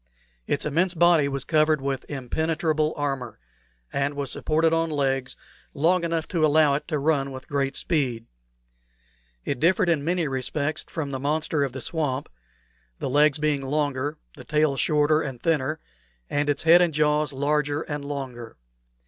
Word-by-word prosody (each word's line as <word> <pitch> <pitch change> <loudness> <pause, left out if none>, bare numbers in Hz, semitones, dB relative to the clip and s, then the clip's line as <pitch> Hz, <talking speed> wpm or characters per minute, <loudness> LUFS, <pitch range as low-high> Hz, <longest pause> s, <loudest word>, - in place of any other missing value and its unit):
Its 145 - 0
immense 170 +5 +1
body 170 -3 +4
was 140 -1 -3
covered 155 -1 +3
with 135 -1 -4
impenetrable 155 +3 -1
armor, 135 -5 -3 0.6
and 140 +1 -1
was 140 -2 -3
supported 160 +1 +1
on 165 0 +1
legs 135 -3 -1 0.4
long 170 +4 +2
enough 165 -1 -1
to 165 -3 -1
allow 155 -1 +4
it 140 - -3
to 155 -2 -1
run 140 -2 +1
with 130 0 -9
great 140 -1 -1
speed. 130 -9 -1 1.2
It 135 - -2
differed 180 +4 +3
in 155 -4 +1
many 170 0 0
respects 140 +3 -2
from 145 -4 -4
the 135 - -3
monster 150 +1 0
of 135 - -2
the 130 - -5
swamp 145 -4 -2 0.7
the - - -3
legs 145 +1 +4
being 150 -2 0
longer, 145 +1 -1 0.2
the - - -11
tail 150 -2 +1
shorter 150 +2 +2
and 135 -5 -5
thinner, 155 0 0 0.5
and 145 0 0
its 145 - 0
head 170 +2 +7
and 170 -4 +1
jaws 150 0 +2
larger 145 +2 0
and 145 -2 -5
longer. 130 -5 -6
150 Hz, 160 wpm, -25 LUFS, 140-155 Hz, 1.2 s, head